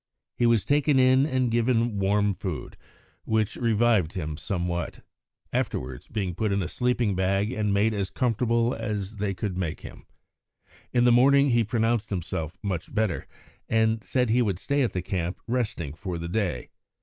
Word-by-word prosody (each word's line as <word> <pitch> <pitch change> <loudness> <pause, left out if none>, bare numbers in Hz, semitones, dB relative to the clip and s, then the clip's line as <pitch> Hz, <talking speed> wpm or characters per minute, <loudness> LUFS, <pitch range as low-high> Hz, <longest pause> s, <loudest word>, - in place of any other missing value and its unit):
He 120 - +2
was 115 -3 +3
taken 145 0 +3
in 130 +2 +5
and 130 -4 0
given 115 -2 +1
warm 100 +1 +2
food, - - -5 0.5
which 110 -2 0
revived 115 -7 +2
him 80 -5 -4
somewhat, 85 0 -3 0.5
afterwards 65 -1 -3
being 100 -5 -2
put 105 +4 -1
in 100 -1 +1
a - - -3
sleeping 120 0 0
bag 95 +3 +1
and 105 -4 -1
made 105 +3 +2
as 100 -3 -2
comfortable 115 0 +1
as 105 -2 -4
they 100 -1 -1
could 100 -2 -3
make 90 -4 -3
him. - - -11 0.8
In 120 - +3
the 120 - +5
morning 140 +3 +5
he 120 -1 +4
pronounced 115 0 0
himself 80 -4 -4
much 95 -5 -3
better, 110 -5 -1 0.4
and 110 0 +2
said 125 -3 0
he 125 +2 +4
would 100 -6 0
stay 140 +8 0
at 125 - 0
the 90 - -2
camp, 90 -1 -3
resting, 110 - -2
for 90 +1 -5
the 85 0 -5
day. 90 - -2
110 Hz, 170 wpm, -26 LUFS, 95-120 Hz, 0.8 s, in